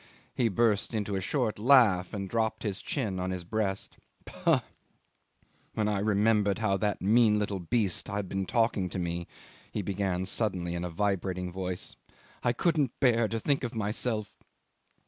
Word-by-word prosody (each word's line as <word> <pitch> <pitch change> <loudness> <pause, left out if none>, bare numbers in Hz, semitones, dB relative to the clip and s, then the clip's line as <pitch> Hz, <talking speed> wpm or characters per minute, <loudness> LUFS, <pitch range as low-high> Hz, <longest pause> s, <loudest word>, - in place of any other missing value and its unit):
He 120 - +2
burst 110 +1 +1
into 105 -2 -1
a 95 - -1
short 115 +1 -1
laugh, 110 -7 +5
and 100 -2 -4
dropped 110 +2 -1
his 105 -3 -2
chin 105 -9 -2
on 90 +1 -2
his 90 -1 -4
breast. 100 +1 -2 0.3
"Pah! - - +1 1.1
When 105 -1 +1
I 105 -2 0
remembered 105 0 +2
how 110 -3 +1
that 105 0 -1
mean 110 +1 +5
little 100 -2 -1
beast 100 0 0
had 100 -1 -3
been 95 0 -3
talking 115 -3 +1
to - - -5
me," 85 -1 -3 0.4
he 105 - -3
began 95 -1 -1
suddenly 90 -4 -1
in 85 0 -3
a 90 - -3
vibrating 95 -1 -1
voice, 90 0 -5 0.4
"I 120 - +2
couldn't 150 -1 0
bear 115 -3 +4
to 115 +1 -2
think 140 +3 0
of 120 -1 -3
myself 110 0 -2
105 Hz, 165 wpm, -29 LUFS, 95-115 Hz, 1.1 s, laugh